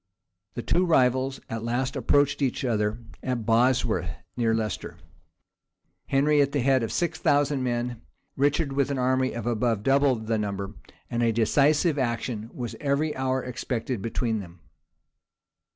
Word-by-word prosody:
The 120 - -4
two 180 - +2
rivals 130 -5 +2
at 115 0 -4
last 125 +4 -1
approached 140 +3 +2
each 135 -1 0
other, 105 -2 0 0.2
at 125 -4 -2
Bosworth 120 +3 +2 0.3
near 115 -2 +1
Leicester; 110 -3 -3 1.1
Henry 145 +2 +3
at 140 0 +1
the 145 - +1
head 130 0 +3
of 115 - -2
six 170 -2 -1
thousand 145 -1 +2
men, 120 -1 -2 0.3
Richard 145 +1 +1
with 140 0 +1
an 140 - -1
army 130 +1 +1
of 115 -2 -5
above 115 -3 0
double 135 +1 +4
the 110 0 -2
number; 100 -1 -3 0.4
and 120 0 0
a 115 -1 +3
decisive 145 - +3
action 120 -3 -2
was 120 -2 -5
every 150 +2 0
hour 130 0 -1
expected 125 -2 -3
between 115 0 -1
them. 85 -3 -11
125 Hz, 150 wpm, -26 LUFS, 115-140 Hz, 1.1 s, double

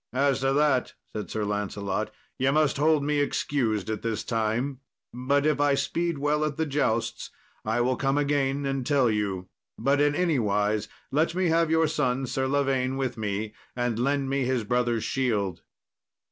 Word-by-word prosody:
"As 135 0 +2
to 135 0 +1
that," 145 -3 +2 0.2
said 105 - -5
Sir 110 -1 -2
Lancelot, 105 0 -2 0.3
"ye 130 +1 +3
must 150 -1 +2
hold 150 0 +3
me 150 0 +1
excused 120 -7 0
at 110 -1 -3
this 115 -2 -2
time, 120 +4 -1 0.3
but 140 +4 +1
if 150 -2 +2
I 145 -1 +4
speed 170 +3 -1
well 145 +2 +1
at 155 -2 -2
the 160 - +1
jousts, 115 -6 -1 0.3
I 110 +2 0
will 130 +1 +2
come 135 +2 0
again 140 -1 +1
and 135 -1 -1
tell 135 -3 +3
you; 100 -4 -2 0.3
but 140 +1 +2
in 145 0 +3
anywise 105 - +1 0.2
let 160 +4 +1
me 185 -2 +2
have 165 0 +3
your 160 0 +3
son, 130 -3 0
Sir 130 +1 -1
Lavaine, 135 -1 +1
with 130 -2 -1
me, 105 0 -3 0.2
and 120 -2 -1
lend 140 +2 +1
me 135 0 0
his 125 -2 0
brother's 120 0 0
shield." 105 -9 -1
135 Hz, 175 wpm, -27 LUFS, 110-145 Hz, 0.3 s, I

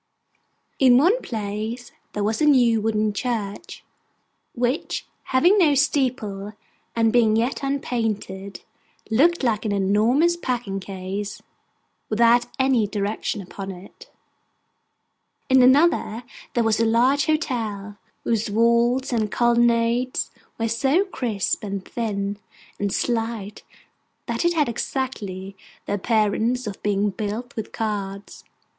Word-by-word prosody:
In 255 -2 +6
one 375 - +4
place, 220 +2 -4 0.2
there 205 - -2
was 220 +5 -1
a 305 - +4
new 240 -6 +4
wooden 215 -1 0
church, 220 - -4 0.7
which, 245 +5 -1 0.2
having 350 +11 +4
no 305 -6 +4
steeple, 245 -8 0 0.4
and 225 -1 +2
being 225 -3 +4
yet 235 +4 0
unpainted, 220 -8 -3 0.5
looked 320 +8 +3
like 225 -4 +1
an 215 - -1
enormous 215 - +3
packing 245 -11 -3
case 195 +2 -5 0.7
without 235 +2 +4
any 260 -5 +2
direction 205 0 -3
upon 195 +1 -8
it. 190 +1 -11 1.4
In 260 0 +6
another 260 -3 +3 0.3
there 240 - +3
was 225 -1 +1
a 230 - +3
large 255 +6 +3
hotel, 220 -10 -2 0.3
whose 225 -2 0
walls 235 +4 +2
and 215 -3 0
colonnades 240 +1 +2 0.3
were 230 - 0
so 270 - +2
crisp, 230 - -2
and 200 -2 -4
thin, 205 -3 -3 0.4
and 200 -1 -1
slight, 225 -3 -2 0.6
that - - -2
it 345 - +3
had 300 -3 +2
exactly 210 -6 -4 0.3
the - - -2
appearance 220 +4 +1
of 205 -2 -6
being 205 0 +1
built 215 +4 -5
with 220 - -5
cards. 200 -2 -4
230 Hz, 120 wpm, -23 LUFS, 205-255 Hz, 1.4 s, In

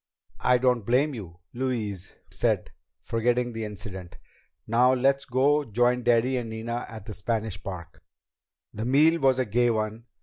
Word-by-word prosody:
"I 125 0 +4
don't 125 -2 +2
blame 130 +7 +2
you," 90 -8 -8 0.2
Louise 115 -7 -3 0.2
said, - - 0 0.3
forgetting 120 +1 0
the 115 -1 -4
incident. 95 -4 -8 0.5
"Now 125 +3 +4
let's 135 +2 +2
go 140 +4 +2
join 120 +1 +1
Daddy 120 +2 +2
and 120 -2 -3
Nina 115 +2 -4
at 110 -3 -9
the 110 - -7
Spanish 110 -2 -3
Park." 90 -4 -8 0.7
The 110 - -4
meal 155 +6 +4
was 135 -1 +4
a 130 - +1
gay 120 +3 +2
one. 110 0 -2
120 Hz, 155 wpm, -26 LUFS, 110-125 Hz, 0.7 s, I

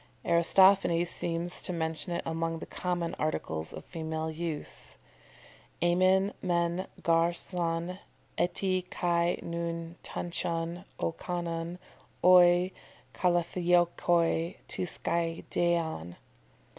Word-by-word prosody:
"] - - -29
Aristophanes 175 0 +5
seems 170 +1 -3
to - - -3
mention 160 0 -3
it 170 - -2
among 165 0 -1
the - - -7
common 175 -2 -2
articles 80 - -2
of - - -9
female 160 -1 -4
use 160 -1 -5 0.9
"aemin 185 +3 +3
men 175 0 0 0.2
gar 165 0 +3
son 170 0 -2 0.4
eti 185 +1 0
kai 170 0 +1
nun 170 0 -4
tantion, 170 +1 -3
o - - 0
kanon, 170 0 -4 0.5
oi 180 0 +7 0.4
kalathiokoi, 175 -1 +2
to - - -1
skiadeion." 165 - -1
170 Hz, 95 wpm, -30 LUFS, 165-175 Hz, 0.9 s, oi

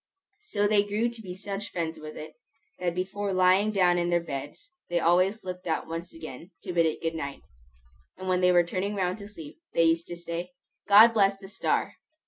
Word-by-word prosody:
So 210 - -1
they 205 -1 +4
grew 210 +3 0
to 235 -1 -10
be 180 -4 -7
such 200 +1 -5
friends 165 -2 -3
with 155 0 -9
it, 155 - -8 0.5
that 175 -1 -1
before 195 +2 -2
lying 185 +3 +4
down 180 -4 +3
in 175 0 0
their 175 0 +3
beds, 165 - -7 0.2
they 175 0 +1
always 185 +6 +2
looked 180 0 -6
out 160 - -1
once 165 +2 -6
again, 165 0 -9
to 180 - -4
bid 170 -1 +4
it 160 - -4
good 165 0 0
night; 140 -4 -5 0.7
and 185 0 -7
when 185 0 +2
they 180 0 +5
were 175 -1 +5
turning 190 +4 -2
round 185 +1 -1
to 200 - -8
sleep, 165 - -11 0.2
they 165 - +5
used 165 0 +2
to 175 - -6
say, 170 +6 -5 0.3
"God 210 +3 +9
bless 200 -2 +3
the 195 0 -11
star!" 190 0 -1
180 Hz, 210 wpm, -27 LUFS, 170-200 Hz, 0.7 s, God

